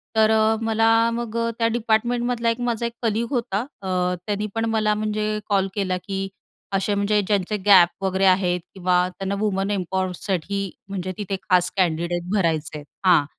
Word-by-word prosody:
तर 220 0 +4
अ, 220 0 +3
मला 225 0 +2 0.3
मग 235 -1 -4
अ, 230 0 0
त्या 230 - +3
डिपार्टमेंटमधला 235 +1 0
एक 230 +1 -2
माझा 235 0 -1
एक 235 - -3
कलीग 225 +1 0
होता 235 -6 -1 0.2
अ, 195 - -6 0.4
त्याने 210 0 -1
पण 225 0 0
मला 215 -1 +2
म्हणजे 215 0 -1
कॉल 195 -2 +2
केला 190 -3 0
की 195 -1 -2 0.5
असे 195 +1 +1
म्हणजे 205 +1 +2
ज्यांचे 205 0 0
गॅप 190 -2 +6
वगैरे 190 0 +1
आहेत 185 -1 +3
किंवा 180 -1 +2
त्यांना 195 +2 -4
वुमन 200 -2 0
एम्पॉवरसाठी 190 0 -2 0.3
म्हणजे 185 -1 -3
तिथे 200 -1 -2
खास 180 -1 +4
कँडिडेट 170 -1 0
भरायचे 160 -6 0
आहेत. 145 - -10 0.2
हां. 170 -5 +5
200 Hz, 165 wpm, -23 LUFS, 185-220 Hz, 0.5 s, गॅप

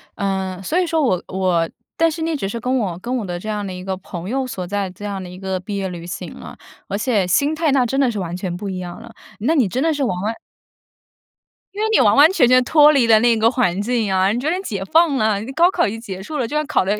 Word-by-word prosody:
嗯， 190 -2 -2
所 320 - 0
以 365 - +2
说 325 -1 0
我 185 -10 +1
我 185 -3 0 0.3
但 330 0 +3
是 320 - -6
那 325 0 -1
只 235 -9 -3
是 230 +4 -4
跟 255 +3 0
我 190 -7 -2
跟 245 +6 -3
我 225 - -3
的 175 -1 -4
这 215 - -7
样 210 -1 -2
的 185 - -5
一 180 - -7
个 190 0 -3
朋 180 -1 -7
友 265 +2 -1
所 225 -8 -5
在 200 0 -2
这 185 +3 -13
样 200 -2 -4
的 - - -8
一 180 +1 -10
个 190 -1 -3
毕 200 +3 -6
业 195 -1 -2
旅 170 -1 -8
行 175 - -6
了， - - -11 0.3
而 200 - -2
且 215 -4 +1
心 285 - +2
态 315 -2 +1
那 265 -2 +3
真 270 +3 -1
的 265 -3 +3
是 215 - -4
完 175 -2 -4
全 180 -2 -4
不 195 +3 -5
一 185 - -4
样 175 -1 -7
了。 235 - -12 0.3
那 275 +10 +1
你 260 -8 +3
真 245 +7 -2
的 320 +1 +2
是 290 -2 -1
完 180 -8 -1
完 215 +3 -1 1.4
因 415 - -4
为 - - +2
你 - - +4
完 210 -5 +5
完 295 +4 +7
全 270 -10 +4
全 255 +1 +5
脱 300 +3 +6
离 275 -5 +3
了 220 -1 +6
那 235 0 +3
个 220 +1 +4
环 235 -8 0
境 235 +1 0
呀， 190 0 +2
你 230 - -1
觉 285 +5 -1
得 360 +3 0
解 200 - -4
放 320 +3 +3
了， 215 -3 +2 0.2
高 345 +2 +5
考 - - +1
已 - - -2
经 225 +1 -7
结 190 -5 -7
束 300 +10 -5
了， 250 -5 -1
就 295 - -5
算 300 0 +1
考 300 - +1
得 205 +3 -1
215 Hz, 310 characters per minute, -20 LUFS, 190-270 Hz, 1.4 s, 完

